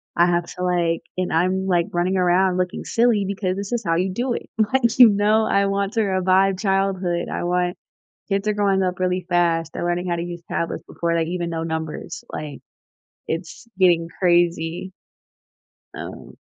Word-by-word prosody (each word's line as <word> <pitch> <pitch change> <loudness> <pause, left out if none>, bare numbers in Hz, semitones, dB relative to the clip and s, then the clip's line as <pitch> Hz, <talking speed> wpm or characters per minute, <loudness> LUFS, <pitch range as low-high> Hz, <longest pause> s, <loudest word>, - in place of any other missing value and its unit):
I 170 - +5
have 175 0 +1
to, 180 - -4
like 170 -2 +1 0.2
and 185 - -1
I'm, 185 +3 +1
like, 175 -2 +2
running 180 +2 +1
around 180 +1 +3
looking 180 -1 -2
silly, 230 -4 +2
because 190 -2 -2
this 200 +3 -5
is 235 -1 -1
how 165 0 +1
you 185 +2 0
do 240 +5 -1
it, - - -6 0.2
like, 235 -3 +2
you 245 -3 +10
know? 210 +2 +3
I 200 0 +2
want 200 +1 -1
to 225 - +2
revive 190 0 +2
childhood, 195 -3 0
I - - -3
want 180 0 0 0.5
kids 200 +1 0
are 210 - +2
growing 195 -2 +2
up 180 0 -2
really 185 -1 0
fast, 165 -2 +1
they're - - -4
learning 175 +1 -1
how 170 - +1
to - - -2
use 175 -1 -7
tablets 170 - -2
before 170 0 -2
they 165 - +2
even 175 -1 -2
know 165 -1 -3
numbers, 160 0 -5
like, 150 -2 -6 0.7
it's 165 +7 -5
getting 170 -3 +4
crazy. 175 0 +1 1.0
Um - - -9
180 Hz, 180 wpm, -22 LUFS, 175-195 Hz, 1.0 s, you